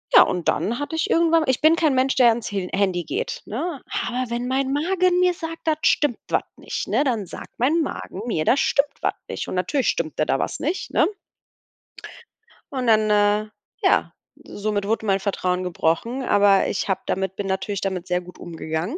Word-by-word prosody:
Ja, - - +11
und 175 -3 -2
dann 210 - 0
hatte 290 +3 -4
ich 320 - -1
irgendwann 330 -1 +4
ich 260 - +1
bin 315 +2 +6
kein 310 -5 +2
Mensch, 260 +1 +2
der 245 -3 +6
ans 230 -1 -1
Hi 195 -3 -3
Handy 190 -3 +1
geht, 160 - -3
ne? 285 +6 -4 0.2
Aber 250 +2 -2
wenn 240 +1 -2
mein 265 +1 0
Magen 360 +4 +2
mir 360 0 +4
sagt, 330 -1 -7
da 315 - +3
stimmt 290 -6 +2
was - - +1
nicht, - - -5
ne? - - +2
Dann 235 -8 -1
sagt - - -11
mein 300 +8 +2
Magen 200 -8 -5
mir, 155 -9 -1
da - - +5
stimmt 280 +1 +2
was - - +1
nicht. - - -5
Und - - -4
natürlich 235 - 0
stimmte 155 -2 -1
da 135 - +1
was - - -2
nicht, 330 +7 -3
ne? - - +3 1.7
Und 255 -2 -2
dann 215 -1 +4
äh, 210 +1 +2 0.3
ja, - - +3 0.3
somit 205 -1 -3
wurde 220 0 0
mein 195 -1 +2
Vertrauen 185 -2 -1
gebrochen, 180 +9 -1
aber 200 -3 +4
ich - - -2
habe 190 - 0
damit 190 0 -2
bin 205 - -4
natürlich 190 +1 -2
damit 185 -2 -3
sehr 180 0 +1
gut 180 0 -13
umgegangen. 165 - -4
220 Hz, 195 wpm, -23 LUFS, 190-280 Hz, 1.7 s, Ja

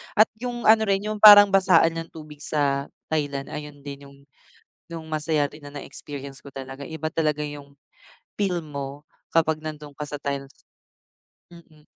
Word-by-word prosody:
at 215 +1 +5
yung 240 -1 -4
ano 220 0 +5
rin 195 0 +1
yung 215 - -4
parang 205 -1 +10
basaan 165 -4 +4
ng 165 - -6
tubig 150 -2 -11
sa 140 -2 0 0.2
Thailand, 145 -3 -2
ayun 150 -1 -8
din 140 0 -9
yung 140 0 -17 0.7
yung 165 -1 -7
masaya 150 -2 0
rin 150 -2 -13
na 145 - -11
na-experience 140 -1 -7
ko, 140 - -14 0.3
iba 160 -1 -4
talaga 150 -2 0
yung 145 -1 -8 0.6
feel 190 -4 0
mo 145 -1 -7 0.2
kapag 160 -1 +1
nandun 150 -2 -8
ka 150 - -5
sa 145 0 -6
Thailand. 140 -1 -4 1.0
Mm. 155 -3 -18
150 Hz, 155 wpm, -24 LUFS, 145-165 Hz, 1.0 s, parang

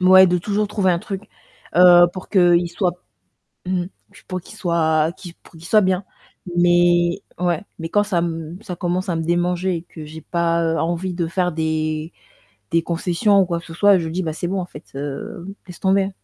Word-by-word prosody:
Ouais, 185 0 +7
de 180 0 +2
toujours 205 +3 -1
trouver 195 -3 +1
un 170 - -1
truc, 195 +2 -7 0.5
heu, 175 0 +8
pour 185 - -9
qu'il 175 -3 +4
soit, 180 0 0 0.7
mmh 180 -1 0
mh, - - -7 0.4
pour 185 -1 -4
qu'il 215 - -14
soit 165 -4 +1
qu'il 175 -3 -11
pour - - -22
qu'il 165 0 -14
soit 215 +3 +5
bien, 185 -1 +1 0.5
mais 175 0 +3 0.2
ouais, 175 0 0 0.2
mais 165 - -4
quand 205 +4 +2
ça 200 -4 -2
m 165 0 -3
ça 180 - -6
commence 180 +3 -2
à 175 - -1
me 165 - -1
démanger, 175 +2 0
et - - -7
que 160 -3 -11
j'ai 160 +1 -9
pas, 170 0 0
heu, 165 0 0
envie 175 +2 -2
de 170 -2 -2
faire 180 0 -1
des 155 0 -2 0.6
des 165 - +2
concessions 180 +5 +2
ou 190 - +2
quoi 170 -1 -2
que 170 - -11
ce 165 - -10
soit, 200 +3 +5
je 165 -2 -3
dis: 185 +3 -2
«Bah 160 - -2
c'est 175 - -3
bon, 190 +1 -1
en 175 - -4
fait, 150 - -12
heu, 145 +5 -6 0.2
laisse 180 - -12
tomber». 195 0 +2
175 Hz, 210 wpm, -21 LUFS, 165-185 Hz, 0.7 s, heu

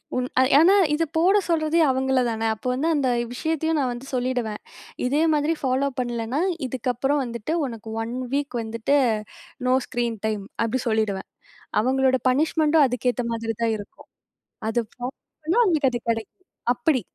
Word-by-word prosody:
உண் 250 0 0 0.3
ஏன்னா 345 +6 +6 0.2
இதை 325 +2 +1
போட 375 +5 +5
சொல்றதே 325 0 +2
அவங்களை 265 0 +1
தானே. 225 0 -2
அப்போ 250 - -7
வந்து 285 +6 -1
அந்த 275 -3 +1 0.2
விஷயத்தையும் 320 +3 -1
நான் 255 -3 0
வந்து 245 +3 -9
சொல்லிடுவேன், 245 -4 -1 0.4
"இதேமாதிரி 305 +3 +2
ஃபாலோ 265 +1 +1
பண்ணலைன்னா, 240 +3 -1 0.3
இதுக்கப்புறம் 260 +3 0
வந்துட்டு 235 +5 -4
உனக்கு 230 -3 -7
1 235 +2 -5 0.2
வீக் 280 -3 -1
வந்துட்டு, 230 +5 0 0.7
நோ 255 - +4
ஸ்க்ரீன் 235 -2 -2
டைம்" 210 -2 -2 0.2
அப்பிடி 235 +2 -1
சொல்லிடுவேன். 215 -3 0 0.5
அவங்களோட 260 +1 +2
பனிஷ்மெண்ட்டும் 305 +2 +3
அதுக்கேத்த 250 0 -1
மாதிரி 225 -1 -3
தான் 225 -1 +2
இருக்கும். 205 - -12 0.6
அது 230 +2 +1
ஃபாலோ 245 - -7 0.4
பண்ணா 330 +8 +1
அவங்களுக்கு 310 - +2
அது 240 - -1
கிடைக்கும் 225 - -3 0.3
அப்படி. 255 +2 +1
255 Hz, 145 wpm, -24 LUFS, 230-295 Hz, 0.7 s, ஏன்னா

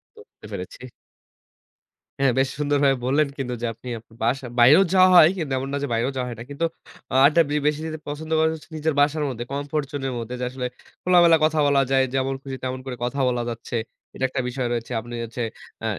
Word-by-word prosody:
তো, - - -16
বুঝতে - - -18
পেরছি। - - -7 1.4
হ্যাঁ, 135 -1 +4
বেশ 135 - +2
সুন্দরভাবে 145 -2 +2
বললেন 140 +4 +2
কিন্তু 125 -3 -3
যে, - - -1
আপনি 120 - -14
আপ 115 - -14 0.2
বাসা 130 +3 0
বাইরেও 140 +10 +8
যাওয়া 185 -1 +7
হয়, 160 -3 +9
কিন্তু 155 -6 -3
এমন 135 +1 -3
না - - 0
যে - - -1
বাইরেও 115 +4 0
যাওয়া 125 -1 -2
হয় 120 - -7
না। - - -6
কিন্তু 145 +4 -2 0.5
আ - - 0
আড্ডা 150 +4 +5
বে 145 - -2
বেশি 150 0 +1
দিতে 160 -1 -5
পছন্দ 155 +2 -6
করেন 160 0 +3
হচ্ছে 160 - -14
নিজের 155 +1 0
বাসার 150 +2 +2
মধ্যে, 120 -2 -5
কমফোর্ট 145 +1 -2
জোনের 135 -2 -3
মধ্যে। 115 +1 -6
যে, - - -3
আসলে, 125 0 -5 0.4
খোলামেলা 175 -2 +6
কথা 155 0 +1
বলা 140 -1 +4
যায়, 135 0 +4
যেমন 135 0 0
খুশি 135 -1 -5
তেমন 130 0 -3
করে 130 -2 -5
কথা 125 +3 -2
বলা 120 -1 -1
যাচ্ছে। 115 +1 -6 0.4
এটা - - -5
একটা 130 0 -2
বিষয় 125 0 -2
রয়েছে। 120 0 -3
আপনি 120 +1 -10
হচ্ছে 115 +2 -6 0.4
আ - - -2
135 Hz, 220 wpm, -23 LUFS, 125-150 Hz, 1.4 s, হয়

